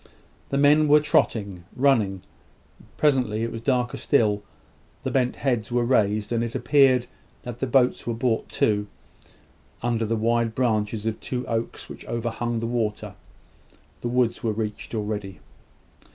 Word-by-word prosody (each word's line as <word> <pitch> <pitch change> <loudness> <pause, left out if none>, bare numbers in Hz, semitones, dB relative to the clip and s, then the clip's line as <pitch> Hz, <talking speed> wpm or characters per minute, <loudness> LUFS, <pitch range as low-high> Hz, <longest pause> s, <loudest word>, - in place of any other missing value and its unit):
The 140 - 0
men 150 +2 +5
were 150 +1 +7
trotting, 100 -10 0
running. 110 -9 +2 0.7
Presently 125 -7 +2
it 115 - -2
was 115 - -6
darker 125 -1 0
still: 105 -7 +2 0.6
the - - -2
bent 125 -2 +1
heads 120 -5 -1
were 120 0 +1
raised, 105 -3 +1
and 115 -1 +1
it 115 -1 -4
appeared 130 -1 +4 0.4
that 120 -1 -7
the 135 - -1
boats 125 -1 +2
were 115 - -1
brought 115 -1 -1
to, 105 -1 +1 1.0
under 115 -2 0
the 115 - 0
wide 115 0 +1
branches 110 -3 0
of 110 -1 -2
two 125 -1 -4
oaks 115 0 -3
which - - -10
overhung 120 0 -2
the 115 - -2
water. 115 -3 -2 0.9
The - - -2
woods 120 -1 +1
were 110 -2 0
reached 105 +1 -4
already. 105 -3 -4
115 Hz, 150 wpm, -24 LUFS, 110-125 Hz, 1.0 s, were